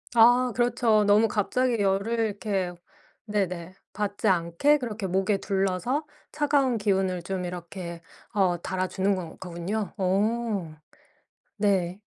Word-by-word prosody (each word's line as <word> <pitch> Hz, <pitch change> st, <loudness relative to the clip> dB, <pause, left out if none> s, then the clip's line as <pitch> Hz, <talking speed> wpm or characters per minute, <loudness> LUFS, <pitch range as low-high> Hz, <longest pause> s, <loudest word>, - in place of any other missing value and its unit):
아 245 Hz, +2 st, +6 dB
그렇죠. 240 Hz, -3 st, +3 dB
너무 205 Hz, +2 st, +5 dB
갑자기 235 Hz, +3 st, 0 dB
열을 200 Hz, +4 st, +1 dB
이렇게 205 Hz, -4 st, -1 dB, 0.5 s
네네. 185 Hz, -4 st, -2 dB, 0.2 s
받지 205 Hz, -1 st, -2 dB
않게 175 Hz, -, +3 dB
그렇게 225 Hz, -6 st, -4 dB
목에 190 Hz, +2 st, +1 dB
둘러서 195 Hz, -, -1 dB, 0.3 s
차가운 285 Hz, -4 st, +2 dB
기운을 190 Hz, -4 st, 0 dB
좀 185 Hz, 0 st, -3 dB
이렇게 175 Hz, -1 st, -7 dB, 0.3 s
어 185 Hz, -4 st, +2 dB
달아주는 190 Hz, +2 st, 0 dB
거 175 Hz, -3 st, -6 dB
거군요. 185 Hz, +3 st, -4 dB
어. 200 Hz, -2 st, 0 dB, 0.8 s
네. 195 Hz, -3 st, +1 dB
200 Hz, 240 characters per minute, -26 LUFS, 185-225 Hz, 0.8 s, 아